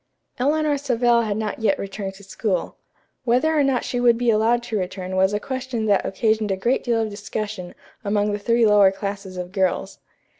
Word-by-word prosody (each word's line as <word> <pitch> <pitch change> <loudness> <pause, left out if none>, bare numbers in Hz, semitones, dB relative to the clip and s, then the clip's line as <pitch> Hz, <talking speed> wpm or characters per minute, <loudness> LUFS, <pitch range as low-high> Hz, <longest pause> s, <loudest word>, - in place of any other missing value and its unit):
Eleanor 295 +2 +1
Savell 240 -3 +2
had 215 -2 -2
not 220 +1 -3
yet 225 +6 +2
returned 195 -1 -5
to 200 - -15
school. 195 -1 -2 0.5
Whether 255 +6 +2
or 295 - +4
not 270 -3 +1
she 245 - -2
would 240 -1 +4
be 240 -1 +2
allowed 225 +2 +2
to 225 -3 -2
return 185 0 -4
was 190 +1 +3
a 205 - -1
question 260 -2 -4
that 205 -2 +3
occasioned 215 +1 0
a 190 - 0
great 240 +7 0
deal 235 -2 +1
of 215 - -4
discussion 205 -2 -5 0.3
among 205 0 0
three 230 +2 +2
lower 205 -2 +6
classes 195 -1 -6
of 180 0 -5
girls. 190 -2 -1
215 Hz, 190 wpm, -22 LUFS, 200-240 Hz, 0.5 s, lower